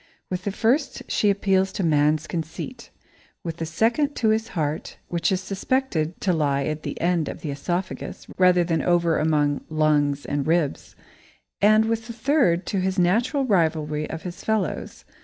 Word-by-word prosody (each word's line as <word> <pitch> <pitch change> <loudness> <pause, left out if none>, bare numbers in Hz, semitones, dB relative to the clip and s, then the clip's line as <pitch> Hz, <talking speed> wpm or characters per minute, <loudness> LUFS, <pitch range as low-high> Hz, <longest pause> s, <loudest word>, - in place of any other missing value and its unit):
With 185 0 -3
the 200 - 0
first 255 +7 0
she 210 - +2
appeals 195 -1 +2
to 195 - -2
man's 150 -1 +2
conceit, 165 - -6 0.5
with 165 -1 -5
the 165 - -3
second 235 - +1
to 220 - +1
his 220 +1 +1
heart, 150 -1 -2
which 170 +3 0
is 185 -1 0
suspected 190 - -1
to 185 - +2
lie 140 -3 +1
at 155 +1 -3
the - - -5
end 170 -2 +1
of - - -7
the 150 - -3
oesophagus, 175 +6 -4
rather 180 -1 +5
than 165 -2 0
over 170 -1 +2
among 150 -2 +1
lungs 150 -2 +1
and 145 0 -2
ribs, 165 -3 0 0.7
and 215 +2 +5
with 225 0 -2
the 235 - -6
third 230 - +2
to 195 - -1
his 190 +1 -1
natural 235 - +2
rivalry 155 -7 +1
of 160 - -6
his 180 -1 -7
fellows. 215 -6 -2
175 Hz, 170 wpm, -24 LUFS, 155-210 Hz, 0.7 s, rather